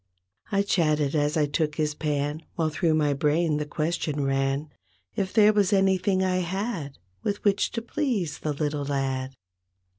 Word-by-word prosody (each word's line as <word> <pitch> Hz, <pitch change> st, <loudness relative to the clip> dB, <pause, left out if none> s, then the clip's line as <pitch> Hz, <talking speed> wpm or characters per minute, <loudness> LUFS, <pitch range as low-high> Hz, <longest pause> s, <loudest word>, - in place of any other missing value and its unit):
I 200 Hz, -1 st, +2 dB
chatted 155 Hz, -7 st, +1 dB
as 150 Hz, +1 st, +1 dB
I 150 Hz, -, +3 dB
took 150 Hz, +1 st, -1 dB
his 150 Hz, -1 st, 0 dB
pan 150 Hz, 0 st, -2 dB
While 160 Hz, -2 st, 0 dB
through 155 Hz, +1 st, +1 dB
my 150 Hz, -2 st, +2 dB
brain 150 Hz, +2 st, +1 dB
the 150 Hz, 0 st, -3 dB
question 150 Hz, -1 st, -1 dB
ran. 135 Hz, +2 st, 0 dB, 0.5 s
If 190 Hz, -1 st, -1 dB
there 215 Hz, -1 st, +5 dB
was 205 Hz, -2 st, +2 dB
anything 190 Hz, -1 st, +2 dB
I 185 Hz, -1 st, +1 dB
had 185 Hz, -, -3 dB, 0.2 s
With 205 Hz, -, -2 dB
which 205 Hz, -1 st, +2 dB
to 230 Hz, -, -3 dB
please 230 Hz, -, -2 dB
the 155 Hz, -, -2 dB
little 145 Hz, 0 st, -2 dB
lad. 135 Hz, -1 st, -2 dB
155 Hz, 160 wpm, -26 LUFS, 145-190 Hz, 0.5 s, there